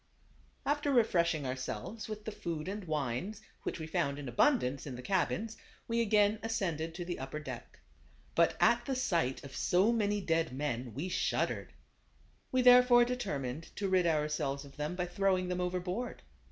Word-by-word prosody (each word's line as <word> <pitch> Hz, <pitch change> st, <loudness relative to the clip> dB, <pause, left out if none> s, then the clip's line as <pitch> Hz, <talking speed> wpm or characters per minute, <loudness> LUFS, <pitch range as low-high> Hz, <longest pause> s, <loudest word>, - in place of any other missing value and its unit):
After 290 Hz, 0 st, +1 dB
refreshing 170 Hz, -, +3 dB
ourselves 130 Hz, -, -4 dB
with 215 Hz, -1 st, -6 dB
the 220 Hz, -, -3 dB
food 165 Hz, -5 st, -4 dB
and 200 Hz, 0 st, -4 dB
wines, 155 Hz, -, -2 dB, 0.2 s
which -, -, -4 dB
we 160 Hz, -, -4 dB
found 160 Hz, -4 st, -1 dB
in 145 Hz, -2 st, -6 dB
abundance 140 Hz, -, +2 dB
in 130 Hz, -, -5 dB
the 125 Hz, -, -8 dB
cabins, 200 Hz, -, 0 dB, 0.3 s
we 235 Hz, 0 st, +1 dB
again 210 Hz, -1 st, +3 dB
ascended 170 Hz, -8 st, -2 dB
to 175 Hz, 0 st, -4 dB
the 175 Hz, 0 st, -4 dB
upper 135 Hz, +3 st, -5 dB
deck. 150 Hz, -, -8 dB, 0.5 s
But -, -, +3 dB
at -, -, +4 dB
the 270 Hz, -, 0 dB
sight 170 Hz, -, 0 dB
of 140 Hz, -1 st, -9 dB
so 190 Hz, +6 st, +3 dB
many 210 Hz, -2 st, +1 dB
dead 165 Hz, -6 st, 0 dB
men 130 Hz, -4 st, -3 dB
we 155 Hz, +6 st, -3 dB
shud 180 Hz, -, +1 dB
dered. -, -, -5 dB, 0.8 s
We 255 Hz, -1 st, +2 dB
therefore 250 Hz, -1 st, +8 dB
determined 160 Hz, -, -4 dB
to 200 Hz, -, -1 dB
rid 185 Hz, -2 st, +3 dB
our 155 Hz, -2 st, +2 dB
selves 140 Hz, -2 st, -2 dB
of 140 Hz, -, -14 dB
them 150 Hz, +4 st, -3 dB
by 180 Hz, -1 st, -1 dB
throwing 185 Hz, 0 st, +1 dB
them 180 Hz, 0 st, -1 dB
overboard. 180 Hz, +6 st, -3 dB
180 Hz, 175 wpm, -32 LUFS, 150-215 Hz, 0.8 s, therefore